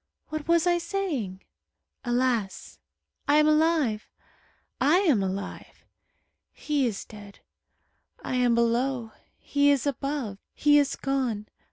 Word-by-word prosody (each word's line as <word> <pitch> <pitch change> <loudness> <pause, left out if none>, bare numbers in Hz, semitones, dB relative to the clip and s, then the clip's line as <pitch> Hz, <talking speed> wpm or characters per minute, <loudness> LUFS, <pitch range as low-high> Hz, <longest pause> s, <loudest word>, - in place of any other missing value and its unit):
What 310 -1 -5
was 335 0 +3
I 350 -1 +3
saying? 325 - -3 0.6
Alas! 240 -5 -1 0.5
I 290 - +4
am 300 0 +5
alive. 305 -8 +2 0.7
I 300 +6 +4
am 295 - +3
alive. 195 +1 -6 0.7
He 290 -4 0
is 210 -4 -4
dead. 205 -2 -13 0.8
I - - -4
am 250 -2 +3
below. 235 0 0 0.3
He 285 0 +1
is 280 -2 +2
above. 275 -6 -3 0.2
He 295 0 +5
is 285 - 0
gone. 255 -6 -2
270 Hz, 120 wpm, -26 LUFS, 225-300 Hz, 0.8 s, am